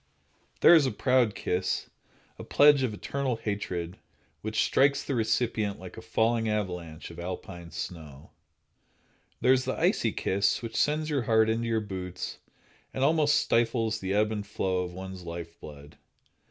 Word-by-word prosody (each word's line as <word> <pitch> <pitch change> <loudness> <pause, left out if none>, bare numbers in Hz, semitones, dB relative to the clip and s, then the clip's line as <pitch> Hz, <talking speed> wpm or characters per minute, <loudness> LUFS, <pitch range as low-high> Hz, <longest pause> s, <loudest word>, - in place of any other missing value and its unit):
There - - +9
is 160 -4 +6
the 130 - 0
proud 125 -5 +2
kiss, 90 +1 -1 0.5
a - - -6
pledge 145 -1 +5
of 130 -4 0
eternal 130 +4 -2
hatred, 95 -5 -4 0.4
which - - 0
strikes 140 +1 +3
the 140 - -3
recipient 110 -3 0
like 90 0 -10
a 115 - -8
falling 115 0 +1
avalanche 90 -7 -4
of 85 - -11
Alpine 85 -1 -7
snow. 75 -6 -8 1.1
There 130 - +5
is 130 0 +1
the 130 - -2
icy - - +2
kiss, 100 +4 0
which 115 -1 -6
sends 155 +1 +1
your 140 -3 +1
heart 110 0 +4
into 115 +1 -1
your 115 -1 +1
boots 95 -3 -6 0.6
and 130 - 0
almost 150 0 +3
stifles 115 -1 +1
the 95 0 -2
ebb 105 +1 +2
and 105 -2 -3
flow 95 -3 -1
of 90 -1 -3
one's 95 +1 -8
life 85 -1 -8
blood. 75 -1 -12
110 Hz, 160 wpm, -28 LUFS, 90-125 Hz, 1.1 s, There